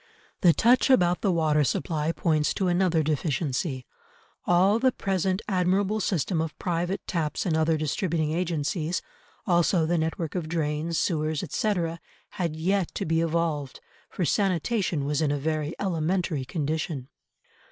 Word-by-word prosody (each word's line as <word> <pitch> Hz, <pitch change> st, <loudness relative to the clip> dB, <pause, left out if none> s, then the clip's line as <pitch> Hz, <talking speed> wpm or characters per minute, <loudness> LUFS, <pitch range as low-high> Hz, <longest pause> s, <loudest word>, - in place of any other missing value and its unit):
The 175 Hz, -, +7 dB
touch 240 Hz, -, +3 dB
about 180 Hz, -9 st, +4 dB
the 200 Hz, -, +2 dB
water 155 Hz, -3 st, +2 dB
supply 155 Hz, +3 st, -1 dB
points 155 Hz, -3 st, +1 dB
to 190 Hz, -, 0 dB
another 175 Hz, -2 st, +2 dB
deficiency; 145 Hz, -2 st, -1 dB, 0.6 s
all 190 Hz, +5 st, +4 dB
the 260 Hz, +1 st, +3 dB
present 190 Hz, -2 st, -1 dB
admirable 195 Hz, +2 st, +1 dB
system 180 Hz, -3 st, 0 dB
of 160 Hz, -1 st, -4 dB
private 175 Hz, +1 st, -2 dB
taps 155 Hz, -4 st, -2 dB
and 165 Hz, -4 st, +1 dB
other 160 Hz, 0 st, +2 dB
distributing 155 Hz, +1 st, -1 dB
agencies, 165 Hz, 0 st, -1 dB, 0.4 s
also 175 Hz, -1 st, +3 dB
the 170 Hz, +1 st, +1 dB
network 160 Hz, 0 st, -2 dB
of 170 Hz, -4 st, -3 dB
drains, 160 Hz, 0 st, -1 dB
sewers, 155 Hz, -3 st, 0 dB
etc., 170 Hz, -6 st, -1 dB, 0.3 s
had 175 Hz, -6 st, -3 dB
yet 185 Hz, +3 st, 0 dB
to -, -, -2 dB
be 160 Hz, +1 st, +1 dB
evolved, 165 Hz, -4 st, -1 dB, 0.3 s
for 180 Hz, -, -2 dB
sanitation 185 Hz, -4 st, 0 dB
was 145 Hz, +1 st, 0 dB
in 150 Hz, -2 st, +2 dB
a 145 Hz, -, 0 dB
very 155 Hz, +1 st, -2 dB
elementary 170 Hz, -4 st, -1 dB
condition. 155 Hz, -2 st, -3 dB
165 Hz, 140 wpm, -26 LUFS, 155-185 Hz, 0.6 s, The